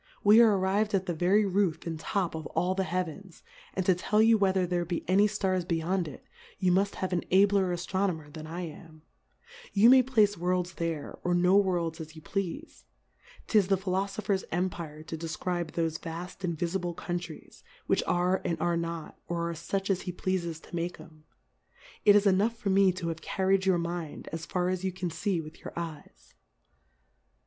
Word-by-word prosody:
We 210 +3 +8
are 215 -4 +5
arriv'd 200 +3 +1
at 190 -1 0
the 175 - -1
very 185 +6 +3
Roof 190 -4 0
and 165 -2 -4
Top 180 +2 -1
of 160 -1 -5
all 180 +1 +2
the 190 0 -1
Heavens 180 +1 -4
^ - - -29 0.3
and 190 - -1
to 185 - +5
tell 200 +4 0
you 225 +1 +6
whether 190 -3 +2
there 175 0 0
be 170 0 -4
any 195 +4 +5
Stars 190 -3 0
beyond 170 +1 -1
it, 145 - -10 0.3
you 185 -2 +2
mufthave 190 0 0
an 175 -1 0
abler 195 0 +4
Aftronomer 175 -3 -2
than 155 0 -8
I 170 +3 -5
am; 160 -2 -10 0.7
you 220 +4 +7
may 260 0 +8
place 220 -5 +3
Worlds 180 0 0
there, 165 -4 -4
or 175 0 +1
no 180 +2 +4
Worlds, 175 -5 +1
as 160 0 -9
you 155 - -11
pleafe: 195 - -4 0.6
'Tis 210 -4 +3
the 195 0 +3
Philofopher's 195 +1 -1
Empire 170 -3 -3
to 160 - -6
def 160 0 -5
cribe 175 -3 -2
thofe 165 -1 -1
vaft 170 +3 -7
invifible 175 +1 -2
Countries, 175 -2 -6 0.2
Mdiich - - +2
are, 180 +2 +1
and 165 -1 -2
are 170 +1 +1
not, 170 -1 -5
or 170 0 -2
are - - -4
fuch 195 +4 -2
as 190 - 0
he 180 - -4
pleafes 175 -3 -2
to - - -9
make 170 0 -3
'em: 155 -1 -15 0.8
It 205 - +8
is 205 0 +4
enough 205 +4 +3
for 215 -4 -1
me 195 0 +5
to 175 -2 -4
have 165 0 -5
carried 190 0 +1
your 185 -2 +4
Mmd^ 170 -2 -4
as 165 0 -6
far 180 -1 0
as 185 0 -2
you 190 - 0
can 180 -1 -4
fee 190 +1 -1
with 155 0 -11
your - - -9
Eyes. 155 - -8
180 Hz, 190 wpm, -29 LUFS, 170-195 Hz, 0.8 s, We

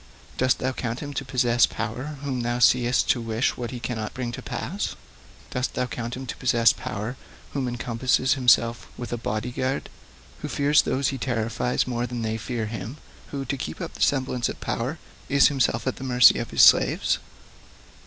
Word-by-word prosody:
Dost 130 -1 +2
thou 130 - -1
count 120 -1 -4
him 145 -1 -6
to 135 - -3
possess 120 -3 +3
power 125 +7 -5
whom 130 -3 -2
thou 120 +1 -1
seest 125 +1 +4
to 120 - 0
wish 115 +2 0
what 120 -1 -4
he 125 - -6
cannot 110 -3 -4
bring 125 -2 -3
to - - -7
pass? - - -4 0.6
Dost 125 +1 -2
thou 125 - 0
count 120 0 -5
him 130 - -6
to - - -5
possess 120 -2 +4
power 110 +5 -5 0.4
who 135 -3 -1
encompasses 125 +2 +1
himself 120 -3 +3
with 120 0 -5
a - - -1
body 110 +1 -3
guard, 130 +2 -2 0.5
who - - -3
fears 145 +1 +3
those 135 +1 0
he 135 - -4
terrifies 120 0 -1
more 120 -1 -2
than 120 -1 -4
they 110 0 -1
fear 115 0 -3
him, 110 +4 -6 0.3
who, 140 -1 -5
to 140 - -2
keep 80 -10 -5
up - - -5
the - - -10
semblance 130 -3 +1
of - - -7
power, 125 +7 -3 0.3
is 140 0 +6
himself 130 -5 0
at 130 - -1
the - - -7
mercy 125 -2 +6
of 115 - -4
his - - +4
slaves? - - +5
125 Hz, 195 wpm, -25 LUFS, 115-130 Hz, 0.6 s, is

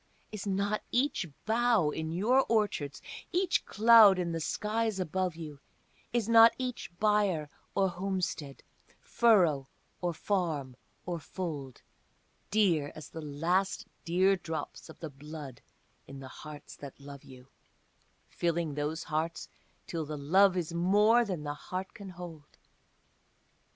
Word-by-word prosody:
Is 215 -1 -6
not 200 +2 0
each 250 -7 +1 0.2
bough 225 -7 +3
in 160 +1 -4
your 235 +10 +3
orchards, 200 -11 0 0.3
each 360 0 +1
cloud 220 -3 +7
in 175 -2 -1
the 165 - -2
skies 215 +5 -1
above 185 0 -1
you, 155 -4 -8 0.5
Is 230 -2 0
not 230 0 +7
each 255 -1 -4
byre 205 -8 +2 0.2
or 195 -1 +3
homestead, 180 -6 -3 0.4
furrow 175 - +3 0.3
or 175 -1 0
farm 160 -8 -2 0.3
or 175 -2 -3
fold, 150 -8 -6 0.7
Dear 175 -9 +2
as 155 - -9
the 160 - -7
last 165 +6 0 0.2
dear 185 +3 +3
drops 160 -3 -6
of 160 - -12
the 160 -3 -5
blood 145 -2 -9 0.5
in 135 0 -9
the 135 -1 -9
hearts 150 0 -10
that 140 -1 -10
love 140 0 -11
you, 130 0 -14 0.8
Filling 170 -3 -1
those 150 +3 -2
hearts 160 +2 -3 0.4
till 165 -2 -4
the 150 0 -4
love 185 +6 +4
is 170 -2 -2
more 205 +7 +4
than 185 -8 -4
the 145 -1 -3
heart 185 +5 -6
can 200 -2 -9
hold? 170 -5 -10
175 Hz, 135 wpm, -30 LUFS, 150-205 Hz, 0.8 s, cloud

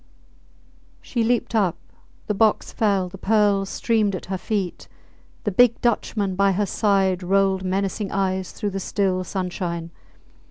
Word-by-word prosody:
She 235 -3 -1
leaped 240 0 0
up; 200 -7 +2 0.5
the 210 - -1
box 215 +1 +2
fell; 200 -4 +1
the 190 +1 -11
pearls 205 -2 +2
streamed 215 -4 +1
at 185 - -7
her - - 0
feet. 200 -5 -3 0.6
The 205 - -1
big 235 +4 +4
Dutchman 210 -4 0
by 195 0 +3
her 205 +3 +1
side 195 -2 +1
rolled 190 +1 +2
menacing 195 +2 -2
eyes 190 -1 -1
through 205 -2 -3
the 195 - -3
still 190 -1 0
sunshine. 175 -3 -4
195 Hz, 145 wpm, -23 LUFS, 185-210 Hz, 0.6 s, big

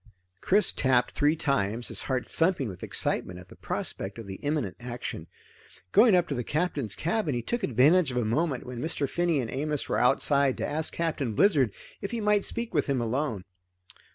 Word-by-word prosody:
Chris 205 +3 +3
tapped 125 -2 +2
three 150 +2 +2
times, 120 -7 0
his - - 0
heart 130 -1 0
thumping 165 -6 0
with 95 -5 -8
excitement 90 - -1
at 90 +1 -13
the - - -13
prospect 95 +3 -4
of 115 - -8
the 95 -1 -7
imminent 145 -10 -2
action. 120 0 -6 0.6
Going 220 -2 +6
up 175 -1 +2
to - - -1
the 125 -2 -2
Captain's 150 - -1
cabin, 170 - -1
he 120 - -2
took 240 - -2
advantage 145 - +4
of 125 - -3
a 120 - +1
moment 130 +4 -1
when 125 -1 -7
Mr. 155 -3 -1
Finney 175 0 0
and 120 -3 -3
Amos 150 +1 -2
were - - 0
outside 135 +1 +3
to - - -2
ask 155 +2 -2
Captain 150 -9 -2
Blizzard 140 - +4 0.3
if 200 - -3
he 235 - -3
might 210 -1 +2
speak 235 0 -3
with - - +1
him 135 -2 +1
alone. 115 -4 -2
140 Hz, 195 wpm, -27 LUFS, 120-165 Hz, 0.6 s, Going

